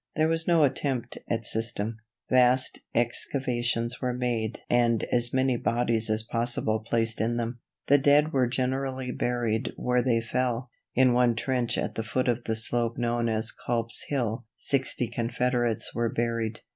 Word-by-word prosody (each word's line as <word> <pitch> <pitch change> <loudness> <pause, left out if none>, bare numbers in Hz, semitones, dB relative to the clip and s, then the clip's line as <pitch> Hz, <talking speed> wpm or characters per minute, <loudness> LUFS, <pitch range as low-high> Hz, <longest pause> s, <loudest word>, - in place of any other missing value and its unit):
There 155 0 +3
was 165 0 0
no 170 -3 +5
attempt 135 -3 -1
at 115 -1 -1
system. 110 -1 -2 0.3
Vast 130 0 +3 0.2
excavations 120 -1 0
were 125 -2 -1
made 120 -3 -2
and 120 -2 +2
as 120 0 +3
many 130 -1 +2
bodies 115 -1 0
as 110 0 +1
possible 115 -1 0
placed 115 0 0
in 120 +2 0
them. 120 +1 -3 0.3
The 145 +1 +5
dead 145 +3 +4
were 130 -2 +3
generally 130 +1 -2
buried 120 -2 -1
where 125 0 +1
they 120 -2 +2
fell. 120 +1 -2 0.2
In 130 -1 +5
one 120 -1 +3
trench 125 0 -1
at - - -2
the 110 - -3
foot 125 +3 -1
of 120 0 0
the 110 - -1
slope 115 +1 -1
known 120 -1 0
as 110 +1 -1
Culp's 115 -1 -2
Hill 120 -4 -2
sixty 130 -3 +1
Confederates 120 0 -1
were 120 -1 0
buried. 115 -1 -2
120 Hz, 160 wpm, -27 LUFS, 115-125 Hz, 0.3 s, no